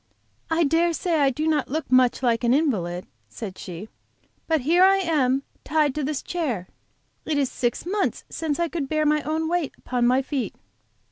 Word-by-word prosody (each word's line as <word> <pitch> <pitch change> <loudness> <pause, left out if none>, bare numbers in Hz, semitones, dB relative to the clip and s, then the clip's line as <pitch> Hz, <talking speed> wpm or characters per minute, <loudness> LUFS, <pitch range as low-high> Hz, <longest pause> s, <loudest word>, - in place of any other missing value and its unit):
"I 330 +1 +2
dare 330 +3 +2
say 330 -1 0
I 280 -2 +4
do 300 +4 -2
not 305 -3 +1
look 305 0 -3
much 255 0 +4
like 235 -1 +2
an 240 +2 +4
invalid," 185 - 0 0.2
said 190 - -7
she; 180 +4 -7 0.6
"but 320 -3 +2
here 340 +7 +4
I 390 +1 +6
am, 280 -7 +1 0.2
tied 305 -3 +2
to 300 - -2
this 290 0 -2
chair. 255 - -2 0.6
It 310 -2 -1
is 275 -3 +1
six 240 +4 -2
months 395 +3 -1
since 310 -2 -3
I 340 - +2
could 305 -5 -4
bear 310 0 +1
my 300 0 +3
own 315 +2 -1
weight 340 -3 -1
upon 245 -1 0
my 255 +2 +3
feet." 270 -1 -3
295 Hz, 190 wpm, -24 LUFS, 250-320 Hz, 0.6 s, I